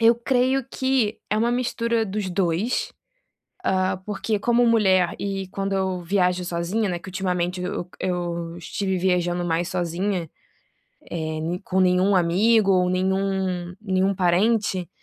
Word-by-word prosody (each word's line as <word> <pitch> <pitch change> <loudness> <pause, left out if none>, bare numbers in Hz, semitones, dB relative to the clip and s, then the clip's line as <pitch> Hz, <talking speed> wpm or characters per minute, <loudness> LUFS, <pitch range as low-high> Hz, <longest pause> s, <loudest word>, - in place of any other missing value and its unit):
eu 230 +1 +6
creio 255 +2 +1
que 260 -5 0
é 210 - 0
uma 235 +2 +2
mistura 235 -2 0
dos 195 -1 -3
2, 185 +5 0 0.7
ah, 185 - +1
porque 210 +1 -1
como 240 +3 +3
mulher, 190 -6 +3
e 195 -1 -3
quando 195 +1 -3
eu 190 -1 -1
viajo 180 0 +1
sozinha, 180 +5 -1
né, 175 -2 -2
que - - -11
ultimamente, 180 -1 -2
eu 180 -1 -4
eu 175 -2 -3
estive 190 +3 -2
viajando 175 -1 +1
mais 170 +1 0
sozinha, 175 -1 -2 0.8
eh, 160 -2 -3
n 175 +3 -2
com 190 0 0
nenhum 185 +2 +3
amigo 195 +5 +3
ou 180 -1 +3
nenhum 185 -1 -1
nenhum 190 -1 +1
parente, 185 0 +1
190 Hz, 140 wpm, -23 LUFS, 180-210 Hz, 0.8 s, eu